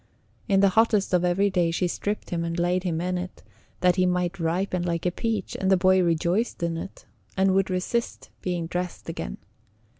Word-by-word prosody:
In 195 -3 +3
the 200 - +6
hottest 210 -1 +2
of 180 -1 +3
every 190 +3 +2
day 175 -3 +2
she 175 +2 0
stripped 205 +4 -3
him 170 -1 -1
and 170 +1 -3
laid 175 +1 +1
him 170 -3 -2
in 180 +1 -1
it, 180 +1 -8 0.4
that 180 0 +3
he 185 0 +3
might 180 +1 -1
ripen 175 +2 0
like 170 -1 -2
a 180 - +2
peach; 220 0 -2
and 190 - +1
the 190 - +6
boy 185 +1 +4
rejoiced 175 +5 0
in 170 -1 0
it, 165 +4 -8 0.3
and 190 0 +4
would 195 0 +2
resist 185 +6 -2
being 175 -2 -2
dressed 180 +1 -4
again. - - -5
180 Hz, 200 wpm, -25 LUFS, 175-195 Hz, 0.4 s, the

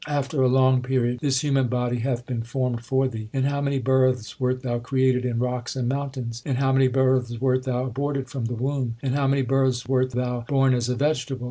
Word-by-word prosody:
After 145 -1 -1
a 130 - +5
long 130 0 +4
period 125 -1 0
this 130 -2 +1
human 135 -3 +2
body 125 0 -1
hath 125 0 -2
been 120 -2 -3
formed 120 0 -2
for 130 +2 +1
thee. 110 -3 -6
In 135 - 0
how 140 +1 0
many 140 -1 0
births 130 -2 +1
wert 130 0 -1
thou 120 -2 -1
created 130 0 +1
in 120 -2 -1
rocks 125 0 -2
and 125 -2 -1
moun 140 +2 -1
tains! 120 -3 -6
In 135 - -1
how 135 +1 +1
many 135 0 +4
births 130 -2 +1
wert 130 0 +1
thou 125 -1 -1
aborted 135 +1 -2
from 130 -3 -4
the 120 +1 -3
womb! 130 -1 -2
In 130 -2 0
how 140 -1 +1
many 135 0 +2
births 130 -1 +1
wert 130 0 +2
thou 125 -1 -2
born 135 -2 +3
as 120 -1 0
a 125 - 0
vegetable 135 -1 -1
130 Hz, 230 wpm, -24 LUFS, 125-135 Hz, -, a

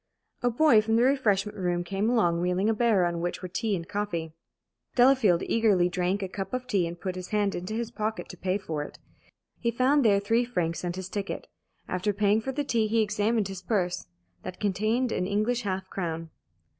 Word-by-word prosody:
A 245 - +2
boy 240 -2 +5
from 225 +1 0
the 235 - +4
refreshment 215 -7 +2
room 175 -2 -1
came 195 +4 -1
along, 175 -8 +2
wheeling 180 +4 +1
a - - +2
barrow 215 -5 +3
on 170 -1 -3
which 175 +2 -3
were - - -3
tea 210 +3 -1
and 165 -2 -5
coffee. 175 -6 -3 0.6
Delafield 245 -9 +5
eagerly 200 -6 +3
drank 185 +2 -1
a - - -2
cup 195 +6 -4
of 255 0 -4
tea 195 -8 +1
and 170 +1 -7
put 185 0 -3
his 185 -1 -6
hand 205 -2 +1
into 180 +5 -4
his 235 0 -3
pocket 220 -1 -3
to - - -8
pay 185 +2 0
for 165 -7 -4
it. 145 - -8 0.6
He 235 - 0
found 260 +5 +3
there 205 -3 +4
three 225 +4 +2
francs 175 -10 -2
and 175 -1 -2
his 185 -1 -5
ticket. 200 0 -4 0.4
After 185 +3 -1
paying 205 +2 +2
for 265 - -3
the 290 +2 -2
tea 230 -5 +1
he 220 +1 +2
examined 210 0 0
his 195 -1 -7
purse. 180 - -1 0.3
That 185 0 -7
contained 215 +5 0
an 180 - -1
English 215 +5 0
half 190 -3 -3
crown. 165 -3 -4
200 Hz, 205 wpm, -27 LUFS, 180-225 Hz, 0.6 s, boy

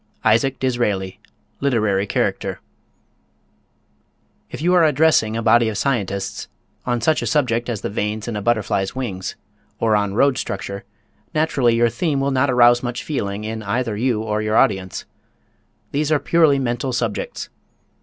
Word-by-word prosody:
ISAAC 130 +5 +3
DISRAELI, 105 -7 -1 0.4
Literary 110 -7 +1
Character. - - -1 1.9
If - - -7
you 175 +4 +2
are 180 -2 +5
addressing 145 -7 +3
a 115 - -2
body 115 +1 +4
of 105 - -4
scientists 100 -8 -2 0.4
on 120 -1 0
such 155 +6 +2
a - - -2
subject 125 -6 +1
as 110 -4 -3
the - - -3
veins 105 +1 -3
in 120 - -3
a 105 - -3
butterfly's 105 -3 0
wings, 100 -8 -4 0.4
or 110 -2 +2
on 100 -1 0
road 135 +2 +3
structure, 100 +1 -5 0.5
naturally 135 -6 +2
your 120 0 +3
theme 140 +4 -1
will 140 +1 0
not 135 +1 +2
arouse 120 -1 +5
much 120 -1 -4
feeling 105 -8 -3
in 110 +1 -4
either 110 +2 -2
you 115 -1 0
or 105 -1 -1
your 110 0 0
audience. 95 -2 +1 0.9
These 150 +2 -1
are 155 - +5
purely 160 -4 +3
mental 125 0 -2
subjects. 115 -3 -3
120 Hz, 155 wpm, -20 LUFS, 105-135 Hz, 1.9 s, are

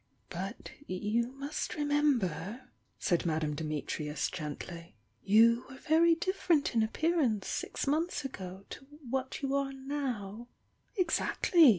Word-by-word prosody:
"But - - -5 0.2
you 210 +6 0
must 280 +2 -3
remember," 255 - 0 0.3
said 175 -3 +1
Madame 155 -3 0
Dimi 155 -1 -3
trius 150 -1 -2
gently 170 0 -6
— 110 - -43
"you 230 +4 +6
were 265 - -10
very 330 +4 +4
different 350 -3 +1
in 230 - +4
appear 320 +10 +1
ance 215 -7 +1
six - - -2
months 310 +2 0
ago 190 -6 -6
to 270 - -9 0.2
what 265 +2 -2
you 275 0 0
are 275 -1 +1
now 250 -6 -4 0.3
'' - - -41
"Exactly! 330 -1 +5
240 Hz, 135 wpm, -32 LUFS, 185-290 Hz, 0.3 s, you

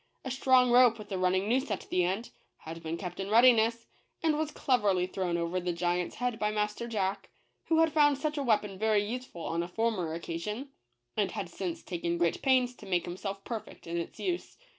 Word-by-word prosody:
A 260 - -3
strong 255 -1 +4
rope, 245 -1 +6
with 215 -1 -11
a 190 - -1
running 185 +2 +2
noose 255 +3 +1
at 205 - -3
the 180 - +3
end, 195 +7 -2 0.3
had 165 +1 -9
been 165 +1 -4
kept 180 0 -6
in 195 0 -3
readiness, 230 0 +5 0.4
and 315 -2 +3
was 310 0 -1
cleverly 210 -11 +1
thrown 185 -2 -2
over 170 +2 -1
the 175 -1 -2
giants 175 +1 -1
head 245 -2 -2
by 210 - +1
Master 210 +2 -2
Jack, 200 -4 -2 0.4
who 325 -1 +3
had 325 -1 +3
found 290 -2 +5
such 300 +1 -2
a 290 - -1
weapon 210 -6 +1
very 215 -1 +2
useful 235 -6 -6
on 165 +1 -1
a 170 - -3
former 185 -5 -1
occasion, 210 - -5 0.5
and 200 -3 0
had 200 -5 -4
since 180 -3 -4
taken 170 -1 -2
great 170 -1 +1
pains 255 -2 +3
to 205 - -12
make 180 -2 +1
himself 195 +2 -5
perfect 220 -3 -7
in 170 0 -3
its 170 - -5
use. 360 -2 -3
210 Hz, 205 wpm, -30 LUFS, 180-245 Hz, 0.5 s, rope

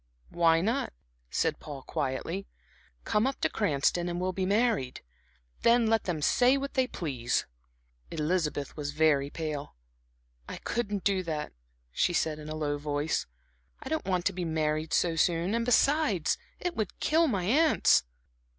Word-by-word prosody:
"Why 165 -1 +4
not," 235 +7 -1 0.4
said - - 0
Paul, 140 -3 -8
quietly. 155 +8 -3 0.6
"Come 210 +4 +1
up 270 - -3
to - - +2
Cranston 175 -2 +1
and 175 - -3
we - - -2
will 185 0 -1
be 185 0 -1
married. 205 - +1 0.6
Then 235 0 +4
let 225 -1 +2
them 160 -5 -2
say 250 - +4
what 275 0 -4
they 260 -3 +2
please." 130 - -2 0.6
Elizabeth 155 -2 -1
was 145 -1 -4
very 150 -2 +3
pale. 150 -2 -5 0.7
"I - - -5
couldn't 205 -5 -2
do 195 -2 +2
that," 155 -4 -4 0.4
she 175 - +1
said 155 -2 0
in 155 0 -8
a 155 - -4
low 145 -2 -2
voice. 145 +1 -1 0.5
"I - - -7
don't 315 0 -1
want 180 -2 0
to 200 - +2
be 180 0 -3
married 155 -1 -1
so 170 -2 +2
soon; 170 +3 +1
and 230 0 +1
besides 245 - +3 0.2
it 355 -1 -3
would 215 -4 -3
kill 325 +2 +3
my 200 -9 0
aunts." 295 - +4
175 Hz, 160 wpm, -29 LUFS, 150-225 Hz, 0.7 s, Why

